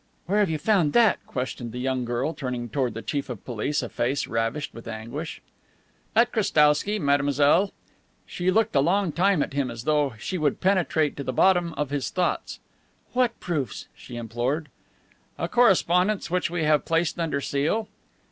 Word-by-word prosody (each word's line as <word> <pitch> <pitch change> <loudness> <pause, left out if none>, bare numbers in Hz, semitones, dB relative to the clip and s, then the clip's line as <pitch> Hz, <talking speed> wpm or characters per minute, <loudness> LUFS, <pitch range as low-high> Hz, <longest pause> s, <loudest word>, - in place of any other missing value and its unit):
"Where 200 +4 +1
have 205 -4 +3
you 160 - 0
found 175 -5 +2
that?" 235 -2 +4
questioned 125 -2 -4
the - - -5
young 130 0 -1
girl, 120 +6 -1
turning 125 -4 -4
toward 125 0 -1
the 115 - -6
Chief 145 -1 -3
of 120 -6 -7
Police 130 +5 -2
a 120 - -5
face 130 +4 -1
ravished 115 +6 -2
with 115 - -11
anguish. 120 +9 -6 0.7
"At 235 +2 +4
Krestowsky, 160 -1 +3
mademoiselle." 145 +4 +3 0.5
She 180 +1 -2
looked 220 +1 +2
a - - +6
long 180 +5 +2
time 185 -1 +2
at - - -7
him 140 -2 0
as 115 -1 -7
though 145 -4 +1
she 185 - -4
would 150 -3 0
penetrate 175 -6 +1
to 140 - -4
the 130 - -2
bottom 175 +4 +3
of 150 -2 -3
his 145 -2 -1
thoughts. 180 -1 -2 0.5
"What 245 -2 +1
proofs?" 145 - -3
she 120 - -11
implored. 120 +7 -2 0.7
"A - - -2
correspondence 195 -4 +3
which 180 -1 +1
we 170 -1 -2
have 150 -1 +3
placed 165 +1 0
under 160 -4 0
seal." 150 +11 -1
150 Hz, 175 wpm, -25 LUFS, 130-180 Hz, 0.7 s, a